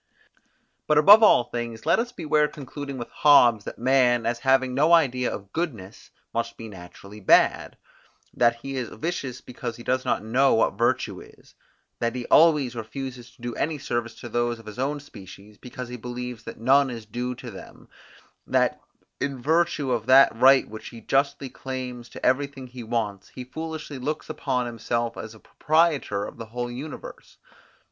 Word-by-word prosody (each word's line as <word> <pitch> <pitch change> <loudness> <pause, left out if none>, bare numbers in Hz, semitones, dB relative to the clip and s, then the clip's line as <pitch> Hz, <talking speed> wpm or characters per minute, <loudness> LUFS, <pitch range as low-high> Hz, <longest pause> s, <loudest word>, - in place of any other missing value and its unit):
But 150 - +3
above 205 +9 +9
all 215 - +6
things 120 -2 -6
let - - +3
us 240 +1 -2
beware 150 -8 +1
concluding 140 -1 -8
with 120 - -7
Hobbes, 120 -8 +5
that - - -7
man, 125 -1 +3
as 120 0 -1
having 130 -1 +2
no 150 +6 +3
idea 130 -7 +3
of 100 -1 -8
goodness, 115 - -5 0.2
must 115 0 -3
be 115 - -8
naturally 100 +1 -12
bad; 100 - +3 0.6
that 120 -1 +3
he 135 +3 -6
is 125 -3 -3
vicious 140 -7 -4
because 120 -1 -6
he 120 - -11
does 130 +1 0
not - - -1
know 130 +5 +3
what 115 - +2
virtue - - 0
is; - - -18 0.5
that 115 +1 -1
he 125 -1 -4
always 150 -6 +5
refuses 125 +2 -7
to 120 - -21
do 120 -1 -3
any 155 +5 -2
service 120 -4 -3
to - - -7
those 120 0 -1
of 115 - -15
his 110 +2 -9
own 145 +3 -1
species, 100 -5 -14
because 125 0 -8
he 125 - -6
believes 125 0 -7
that - - -8
none 135 +4 +4
is 115 -3 -7
due 125 +3 -4
to 120 -1 -9
them; 95 - -13 0.6
that, - - +1 0.4
in 140 -1 -3
virtue 155 -1 +1
of 115 -2 -1
that 135 -1 +6
right 130 +3 +5
which 110 +1 -9
he 115 - -11
justly 140 +4 0
claims 125 -2 -7
to - - -7
everything 135 0 0
he 125 0 -10
wants, 110 -4 -3
he 130 - -8
foolishly 155 +1 -6
looks 150 +4 -4
upon 130 -4 -1
himself 115 0 -2
as 110 0 -8
proprietor 150 -5 0
of - - -9
the 115 - -7
whole 120 +2 -4
universe. 140 +5 -9
125 Hz, 175 wpm, -25 LUFS, 115-140 Hz, 0.6 s, above